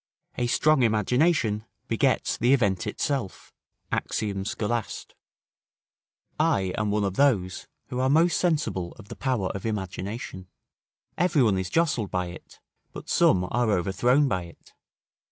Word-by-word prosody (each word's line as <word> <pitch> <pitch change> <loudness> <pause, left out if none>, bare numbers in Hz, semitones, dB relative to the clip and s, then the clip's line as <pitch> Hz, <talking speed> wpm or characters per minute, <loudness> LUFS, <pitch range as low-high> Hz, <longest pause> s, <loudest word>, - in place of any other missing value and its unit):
["A 120 - -1
strong 155 +3 +3
imagination 115 - +2 0.2
begets - - +1
the 125 +3 +3
event 100 -8 0
itself." 135 -10 -3 0.4
Axiom. 100 -2 -2
Scholast.] 110 0 -3 1.3
I 95 -2 +1
am 105 -1 -1
one 105 0 +1
of 100 -1 -2
those 100 -11 +1 0.2
who 125 -2 -3
are 130 +1 +2
most 165 +4 +4
sensible 150 - 0
of 100 - -15
the - - -7
power 125 -8 -1
of 100 - -5
imagination: 95 -1 -5 0.7
every 170 -5 +3
one 100 -5 +2
is 95 0 -3
jostled 150 - +1
by 90 -1 -2
it, 85 - -13 0.3
but - - -9
some 90 - +4
are 120 -1 +1
overthrown 115 - +2
by 95 -7 -1
it. 85 - -17
110 Hz, 135 wpm, -26 LUFS, 95-130 Hz, 1.3 s, most